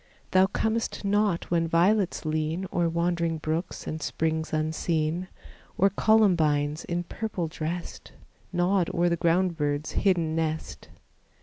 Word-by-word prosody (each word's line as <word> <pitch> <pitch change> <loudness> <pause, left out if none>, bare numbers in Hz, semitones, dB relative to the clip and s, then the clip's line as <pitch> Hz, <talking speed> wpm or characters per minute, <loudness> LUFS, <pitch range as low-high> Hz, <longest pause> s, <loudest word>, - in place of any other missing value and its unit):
Thou 185 0 +5
comest 220 +1 -2
not 205 -4 +1
when 165 -1 +2
violets 180 +2 +2
lean 155 +4 -1
O'er 170 -1 +2
wandering 170 -1 0
brooks 155 +3 -3
and 155 0 -4
springs 160 +2 -1
unseen, 160 +2 -1 0.5
Or 195 +1 +4
columbines 160 -9 +3
in 175 0 -2
purple 190 -2 -4
dressed, 165 +2 -5 0.4
Nod 180 0 +1
o'er 175 +1 +3
the 170 - +1
ground 170 +1 +1
bird's 145 0 -1
hidden 170 -5 +1
nest. 160 -1 -3
170 Hz, 125 wpm, -27 LUFS, 160-185 Hz, 0.5 s, Thou